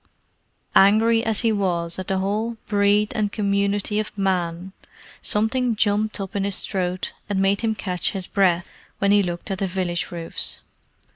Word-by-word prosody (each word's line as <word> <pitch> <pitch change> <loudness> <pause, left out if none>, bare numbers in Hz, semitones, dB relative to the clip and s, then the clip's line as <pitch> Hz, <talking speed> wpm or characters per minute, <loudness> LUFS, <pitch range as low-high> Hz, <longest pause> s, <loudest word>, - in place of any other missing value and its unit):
Angry 225 +3 +5
as 225 -3 0
he 230 -2 +2
was 175 -4 -1
at 185 - -5
the 190 - 0
whole 215 +4 -1
breed 205 0 +2
and 210 -1 0
community 200 0 0
of 215 -1 -5
Man, 185 -1 -1 0.5
something 230 +3 +1
jumped 210 +1 +1
up 195 0 -6
in 200 - 0
his 200 -1 0
throat 185 -2 -2 0.2
and 200 -2 0
made 195 +1 +2
him 225 -2 0
catch 180 -4 -1
his 190 -2 -4
breath 180 -3 +2 0.3
when 200 0 +2
he 205 0 +6
looked 175 +1 -4
at 190 - -2
the 195 - 0
village 180 -2 -2
roofs. 170 -1 -3
200 Hz, 165 wpm, -23 LUFS, 185-210 Hz, 0.5 s, he